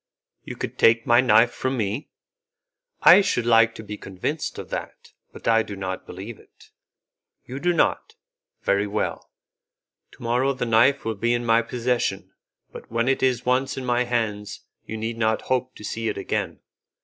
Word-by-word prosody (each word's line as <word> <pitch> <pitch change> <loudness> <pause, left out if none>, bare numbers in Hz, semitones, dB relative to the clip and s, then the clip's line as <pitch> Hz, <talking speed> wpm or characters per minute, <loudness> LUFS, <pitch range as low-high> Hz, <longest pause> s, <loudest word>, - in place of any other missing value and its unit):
"You - - -7
could - - -6
take 115 0 +4
my 120 +1 +5
knife 120 -1 +5
from 130 +1 -3
me? 110 +5 -3 0.9
I - - +9
should 120 -11 0
like 115 -1 +4
to 110 - -8
be 105 -1 -7
convinced 100 - -4
of - - -8
that, - - -7 0.2
but - - -10
I 115 -1 +5
do 105 - -6
not 95 -1 -5
believe 100 +5 -8
it." - - -22 0.7
"You 130 +2 -7
do 175 +4 +1
not? 170 - 0 0.5
Very 100 +1 +1
well, 105 +1 -3 0.8
to - - -14
morrow 125 +4 +1
the 125 -2 -3
knife 120 +5 +3
will 115 - -1
be 115 +3 0
in 120 0 -3
my 115 0 +4
possession, 120 +1 -2 0.4
but - - -12
when 115 +1 0
it 135 - +1
is 125 -2 +1
once 130 +2 +1
in 130 - -4
my 125 0 +1
hands 110 -4 -3 0.3
you 110 - -5
need 115 +1 -4
not 110 -1 +1
hope 130 0 -1
to - - -12
see 115 +2 -3
it - - -4
again. - - -3
115 Hz, 180 wpm, -24 LUFS, 110-125 Hz, 0.9 s, I